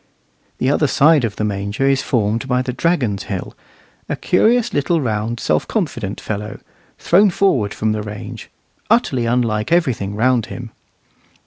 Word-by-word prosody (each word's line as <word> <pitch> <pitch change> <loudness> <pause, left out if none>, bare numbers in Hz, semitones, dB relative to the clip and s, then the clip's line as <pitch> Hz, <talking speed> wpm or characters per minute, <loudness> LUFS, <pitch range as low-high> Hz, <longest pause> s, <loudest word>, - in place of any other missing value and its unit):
The 130 - +1
other 150 +1 +2
side 150 +1 +4
of 110 -3 -2
the - - -3
Manger 100 +5 -1
is 135 -1 +2
formed 115 +1 0
by 125 -1 +1
the 125 -1 -3
Dragon's 125 - 0
Hill, 95 -3 -5 0.5
a - - 0
curious 230 +4 +2
little 160 +4 +1
round 115 -2 -2
self - - 0
confident 120 - -3
fellow, 105 0 -5 0.4
thrown 200 +4 +4
forward 140 - +1
from 110 0 -1
the 105 0 -2
range, 105 -1 -8 0.4
utterly 120 -3 +2
unlike 115 0 0
everything 125 - +1
round 120 +1 +2
him. 120 -2 -8
120 Hz, 150 wpm, -19 LUFS, 105-145 Hz, 0.5 s, side